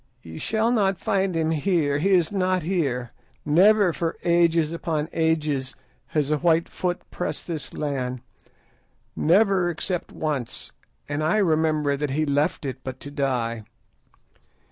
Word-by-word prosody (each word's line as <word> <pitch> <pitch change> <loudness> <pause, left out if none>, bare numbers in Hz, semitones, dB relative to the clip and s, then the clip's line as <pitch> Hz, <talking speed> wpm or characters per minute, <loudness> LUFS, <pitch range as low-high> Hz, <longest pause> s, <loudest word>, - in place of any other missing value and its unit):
Ye 80 -1 -9
shall 225 +1 +1
not 195 -5 +2
find 195 -3 0
him 160 -1 +1
here. 155 -3 +1
He 190 +6 +1
is 180 -4 +3
not 185 -3 0
here. 140 -9 -1 0.3
Never 185 +4 +5
for 165 0 -2
ages 170 -2 +3
upon 160 -2 -2
ages 155 -5 0 0.3
has 150 -1 -1
a 150 - +1
white 165 0 +3
foot 180 -1 -3
pressed 180 - -4
this 160 -5 -5
land; 130 -4 -3 0.9
never 190 +1 +3
except 175 +2 -3
once, 145 -6 -4 0.4
and 145 +1 -2
I 160 +7 +2
remember 155 -6 +2
that 145 0 -2
he 155 +4 0
left 145 +2 0
it 130 -1 -4
but 130 -1 -6
to 145 - -8
die. 120 -5 -1
160 Hz, 145 wpm, -24 LUFS, 145-180 Hz, 0.9 s, Never